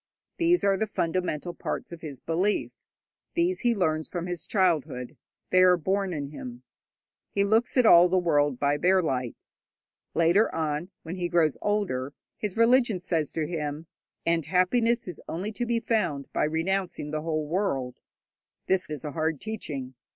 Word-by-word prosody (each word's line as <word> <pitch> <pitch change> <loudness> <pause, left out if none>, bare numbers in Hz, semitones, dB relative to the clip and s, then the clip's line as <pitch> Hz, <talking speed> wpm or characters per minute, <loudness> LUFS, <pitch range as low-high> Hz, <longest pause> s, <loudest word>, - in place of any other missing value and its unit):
These 345 +1 +3
are 195 -1 +3
the 220 - -1
fundamental 175 -3 -2
parts - - -5
of 170 -1 -9
his 145 -5 -7
belief; 180 +8 0 0.6
these 350 +2 +1
he 240 -2 +2
learns 160 -5 0
from 175 -1 -4
his 175 -1 -4
childhood: 160 - 0 0.4
they 185 - +5
are 180 -1 +6
born 190 +3 0
in 145 -4 -4
him. 125 -4 -8 0.7
He 200 - +1
looks 220 +6 +2
at 250 - +5
all 175 -3 +8
the 185 - +2
world 145 -6 +2
by 145 +1 +2
their 185 +4 +3
light. 125 -6 -3 0.7
Later 175 +6 +4
on, 155 +2 -2
when 170 +3 -6
he 175 -1 -2
grows 165 -4 +3
older, 165 -11 -1 0.2
his 210 -1 -4
religion 230 -3 +4
says 165 -4 -1
to 160 -2 -1
him, 150 -1 -4 0.4
'And 165 -3 +1
happiness 225 +7 +2
is 180 - -6
only 190 +6 -3
to 240 +2 -3
be 235 0 +1
found 210 -12 -1
by - - +2
renouncing 165 0 -2
the 155 0 -2
whole 155 -1 -1
world.' 145 -7 -2 0.7
This 190 -1 +2
is 150 -2 -5
a 150 - -3
hard 160 -1 -1
teaching. 145 -12 -5
175 Hz, 165 wpm, -27 LUFS, 150-200 Hz, 0.7 s, all